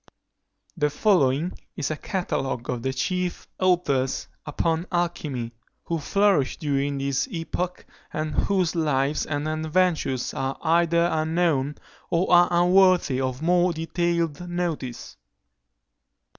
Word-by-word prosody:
The 150 -4 +1
following 155 -2 +2 0.2
is 145 - -1
a - - -1
catalogue 135 - -3
of 125 -2 -3
the 130 - -1
chief 180 +7 -2
authors 160 -8 +1 0.2
upon 165 +3 -1
alchymy, 155 -9 -2 0.3
who 165 -1 -2
flourished 195 -3 +2
during 140 -2 -1
this 140 - -1
epoch, 180 -1 -4 0.3
and 155 0 -3
whose 185 -2 +1
lives 150 -3 0
and 145 0 -2
adventures 155 -4 0
are 135 0 -2
either 170 +1 +3
unknown 155 -3 +1 0.3
or 180 +2 +1
are 175 0 +7
unworthy 175 -5 +4
of 130 +2 -3
more 175 +1 +3
detailed 170 0 -1
notice. 170 -8 -4
160 Hz, 115 wpm, -25 LUFS, 140-175 Hz, 0.3 s, are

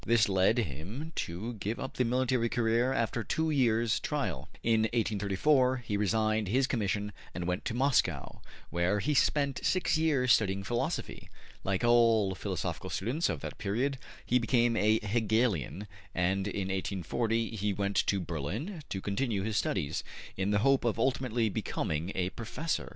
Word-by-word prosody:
This 115 -2 +4
led 95 +3 +3
him 105 - -4 0.2
to 95 +9 -5
give 105 +4 -3
up 135 - -5
the 125 - +3
military 125 -1 +1
career 120 +2 +2
after 115 -2 0
two 160 +7 0
years' 115 -5 +2
trial. - - -3
In 115 -1 +3
1834 120 +5 +2
he 105 - -1
resigned 110 +1 +1
his 130 +7 +2
commission 105 -4 -1 0.2
and 85 0 -3
went 90 +1 -2
to 115 - -2
Moscow, 120 - +1 0.3
where 85 +4 +1
he 150 +8 0
spent 140 -1 +2
six 185 -3 +2
years 140 -6 +2
studying 100 -1 +1
philosophy. 120 +4 -3 0.3
Like 95 +2 -1
all 115 -4 +4
philosophical 90 - -4
students 130 - -1
of - - -3
that - - -7
period, 120 +6 -1 0.3
he 125 - +3
became 120 -1 +2
a 110 +1 +3
Hegelian, 105 - 0 0.3
and 95 +2 +1
in 100 -1 -3
1840 105 +4 -1
he 105 0 0
went 100 0 -1
to 100 - +2
Berlin 95 - -4
to 95 - -3
continue 100 0 -1
his 110 0 -2
studies, 75 -7 -1 0.3
in 95 +1 -1
the 105 - +3
hope 135 -1 +4
of 120 -2 0
ultimately 125 -3 +1
becoming 85 -3 -2
a 95 0 -1
professor. 150 +8 -3
110 Hz, 155 wpm, -30 LUFS, 100-125 Hz, 0.3 s, This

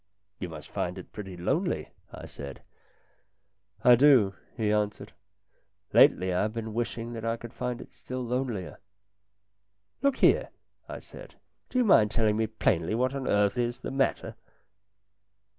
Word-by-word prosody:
" 100 +1 -50
You 90 - -4
must 80 -2 -10
find 90 +1 -3
it 95 - -10
pretty 95 -4 -8
lonely," 85 - -1 0.2
I - - -9
said. 70 -1 -9 0.6
" 100 +1 -38
I 125 -2 +8
do," 120 -6 +6 0.2
he 110 -3 +1
answered. 105 -1 -2 0.4
" - - -42
Lately 95 0 +5
I 90 - +1
have 110 +1 -1
been 110 -1 -5
wishing 115 0 -3
that 115 -1 -6
I 115 0 -1
could 120 0 -10
find 125 -1 -3
it - - -12
still 130 -1 -6
lonelier." 120 -6 -3 0.6
" 100 0 -50
Look 280 -1 +2
here," - - +4 0.4
I - - -5
said, - - -13 0.2
" - - -48
do - - -3
you 250 - +4
mind 110 - +6
telling 110 -2 +1
me 110 0 0
plainly 105 -3 0
what 130 +3 +1
on 135 -1 -4
earth 100 +3 +2
is 120 0 -1
the - - -5
matter 135 0 0
110 Hz, 175 wpm, -28 LUFS, 100-120 Hz, 0.6 s, I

